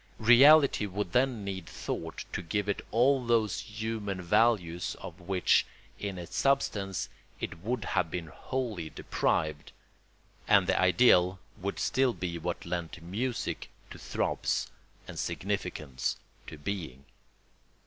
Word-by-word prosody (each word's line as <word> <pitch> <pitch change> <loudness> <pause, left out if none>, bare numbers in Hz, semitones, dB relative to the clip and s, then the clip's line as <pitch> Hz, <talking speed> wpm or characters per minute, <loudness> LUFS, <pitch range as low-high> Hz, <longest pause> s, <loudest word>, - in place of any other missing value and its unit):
Reality 130 +1 +7
would 100 -1 -3
then 125 -2 +2
need 95 -1 -5
thought - - -5
to - - -2
give 100 +4 -2
it 100 - -1
all 130 +3 +3
those 115 -4 +2
human 110 -3 -4
values 90 -2 +2
of 90 +2 -9
which, 90 -1 +3 0.4
in 100 -2 -4
its 90 0 -8
substance, 105 -9 +1 0.3
it - - -5
would 110 +3 -2
have - - 0
been 85 0 -4
wholly 105 -1 -4
deprived; 75 -1 -1 0.8
and 100 -2 +5
the 95 0 +2
ideal 95 -2 +5 0.2
would 100 +2 -4
still 130 -2 +2
be 85 -2 -4
what 85 +1 -4
lent 85 -1 -4
music 115 +8 -3 0.2
to - - -9
throbs - - -1 0.4
and - - -7
significance 90 -9 -2 0.3
to 80 - -8
being. 75 -5 -5
100 Hz, 130 wpm, -30 LUFS, 85-115 Hz, 0.8 s, Reality